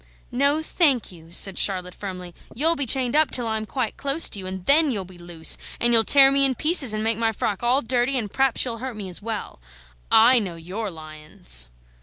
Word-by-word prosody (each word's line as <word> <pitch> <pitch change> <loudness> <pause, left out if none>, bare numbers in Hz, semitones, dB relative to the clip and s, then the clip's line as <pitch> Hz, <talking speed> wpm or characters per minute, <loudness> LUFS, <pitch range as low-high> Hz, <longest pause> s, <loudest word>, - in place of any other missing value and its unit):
"No, 280 +5 +1
thank 285 - +1
you," 165 -2 -15
said 190 +1 +1
Charlotte, 180 -2 0
firmly; 180 -3 -8 0.2
"you'll 320 +7 +2
be 280 -4 -4
chained 255 +1 0
up 310 0 +3
till 245 - 0
I'm 220 -1 -2
quite 250 -3 -4
close 280 +3 -1
to 205 - -1
you, 185 - -8
and 185 -1 -7
then 300 +2 +4
you'll 205 -7 -3
be 180 -1 -16
loose, 175 -2 -1 0.2
and 240 0 +3
you'll 225 -1 +6
tear 270 +2 +5
me 275 0 +2
in 265 -1 +1
pieces, 305 -4 +3
and 215 0 -3
make 225 0 0
my 225 -1 +1
frock 205 -2 -3
all 250 +4 +1
dirty, 245 +3 0
and 215 -5 -4
p'raps 270 -2 +1
you'll 230 -2 -5
hurt 255 -1 -6
me 200 -3 -8
as 180 - -8
well. 220 - -6 0.5
I 240 +3 +6
know 190 -6 -6
your 185 +6 -6
lions!" 155 - -4
225 Hz, 220 wpm, -22 LUFS, 185-265 Hz, 0.5 s, you'll